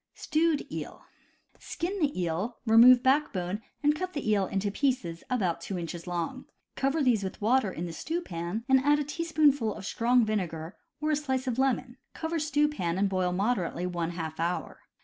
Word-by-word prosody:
Stewed 315 -1 +1
Eel. - - -7 0.3
— - - -34
Skin 375 +4 -2
the 290 - 0
eel, 180 +7 -2
remove 240 +2 +7
backbone 215 -9 +1 0.2
and 295 +1 +4
cut 370 +3 -4
the 290 -6 -4
eel 200 -3 +2
into 200 +1 -1
pieces 250 -9 -1
about 185 -10 0
two 185 +2 -4
inches 170 0 -6
long; 175 +9 -3 0.3
cover 280 +3 +1
these 235 -6 +3
with 190 - -5
water 225 -1 +2
in 175 0 -5
the 170 - -6
stew 325 - -3
pan, 175 - -5
and 265 -1 +5
add 290 +2 +3
a 295 - 0
teaspoonful 295 - +1
of - - -8
strong 240 +2 +2
vinegar 175 -6 -3 0.3
or 305 0 +1
a - - +3
slice 265 -3 -2
of 250 -1 -2
lemon, 260 -1 0 0.2
cover 325 0 -2
stew 295 0 +2
pan 180 - -2
and 200 0 +2
boil 185 -1 0
moderately 185 -3 -1
one 175 -2 -2
half 160 -2 -5
hour. 170 +2 -2
230 Hz, 190 wpm, -28 LUFS, 180-285 Hz, 0.3 s, remove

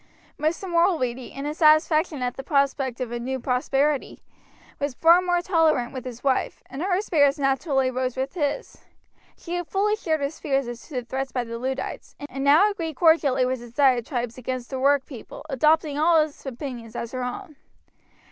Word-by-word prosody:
Mr. 320 +6 -1
Mulready, 325 -9 +1
in 275 +1 -6
his 300 +2 -4
satisfaction 310 -2 +4
at 245 0 -2
the - - -5
prospect 275 -2 0
of 250 -2 -4
a 240 - -3
new 260 +2 -3
prosperity, 270 +3 0 0.6
was 285 -2 -2
far 335 +5 +6
more 355 -1 +1
tolerant 320 -9 +2
with 260 -2 -6
his 245 -1 -8
wife, 270 -2 0
and 270 - -6
her 370 +1 +1
spirits 290 -7 +3
naturally 270 -1 +1
rose 255 0 -2
with 265 +1 -2
his. 325 +7 -3 0.6
She 340 - -7
had 350 -2 -4
fully 415 +2 +1
shared 320 -7 -1
his 280 +3 -3
fears 275 -3 0
as 240 -1 -8
to 295 - -10
the 250 -1 -2
threats 265 +2 -3
by 250 - -1
the 230 0 -6
Luddites, 265 +2 -4
and 270 -1 -5
now 315 +9 +5
agreed 325 -6 -5
cordially 300 -5 +4
with 255 0 -1
his 235 -1 -12
diatribes 245 -2 +1
against 255 0 -5
the 265 - -3
workpeople, 275 -1 -1
adopting 300 +2 +2
all 325 +1 +5
his 305 -2 -9
opinions 245 -3 -7
as 235 - -4
her 255 -1 -3
own. 305 +6 -6
275 Hz, 185 wpm, -24 LUFS, 255-315 Hz, 0.6 s, far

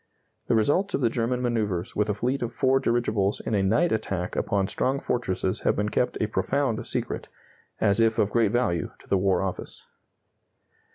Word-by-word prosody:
The - - +3
results 145 - +2
of - - -2
the 115 -3 +2
German 125 +1 -1
manœuvres 105 -7 -1
with 105 +1 +1
a 105 - 0
fleet 125 +6 -1
of 120 -1 -2
four 135 +1 +2
dirigibles 110 -5 +1
in - - -4
a 100 - +3
night 155 - +2
attack 100 -5 -2
upon 100 -1 +1
strong 130 +7 0
fortresses 95 -8 -1
have - - +1
been 105 +1 0
kept 125 - 0
a - - +2
profound 130 +2 -1
secret, - - -3 0.5
as 100 +1 +3
if 115 -1 +3
of 105 - +2
great 115 -4 +2
value 95 -10 0
to - - -20
the 100 - +2
War 95 -1 +2
Office. 95 -2 -5
110 Hz, 185 wpm, -26 LUFS, 100-125 Hz, 0.5 s, The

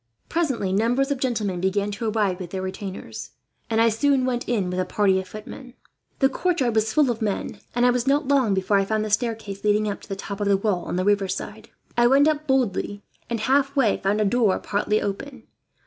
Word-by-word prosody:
Presently, 265 - 0
numbers 245 +7 +1
of 280 - -1
gentlemen 215 -8 -1
began 200 +2 0
to 220 +2 -2
arrive 205 -4 0
with 180 -2 -6
their 190 +1 -4
retainers, 190 0 -7 0.4
and 225 -1 +1
I 230 0 +5
soon 260 +4 +2
went 245 -2 -2
in 200 -7 0
with 180 - -2
a - - +2
party 190 +1 +2
of 190 - -6
footmen. 230 +6 -10 0.4
"The 270 - +4
courtyard 280 -5 0
was 220 0 +1
full 285 0 +3
of 230 0 -5
men, 210 -3 -2 0.2
and 245 0 +3
I 250 - +5
was 245 +1 -1
not 285 +1 +2
long 260 -8 +3
before 190 +2 +2
I 195 - +1
found 215 +1 -1
the 215 - -4
staircase 215 -3 -2
leading 210 0 +2
up 205 - -4
to - - -15
the 195 - -2
top 200 +1 -6
of 205 - 0
the 200 -1 +4
wall, 195 -3 -1
on - - -3
the 185 +1 0
river 205 -1 +2
side. 190 - -6 0.3
I 240 0 +5
went 275 +4 +5 0.2
boldly 205 -6 0
up - - -40
and, 235 -1 -2
halfway, 275 -2 +2
found 200 +2 0
a 215 - +2
door 220 -2 +2
partly 210 +1 0
open. 245 +5 -5
215 Hz, 225 wpm, -24 LUFS, 200-250 Hz, 0.4 s, I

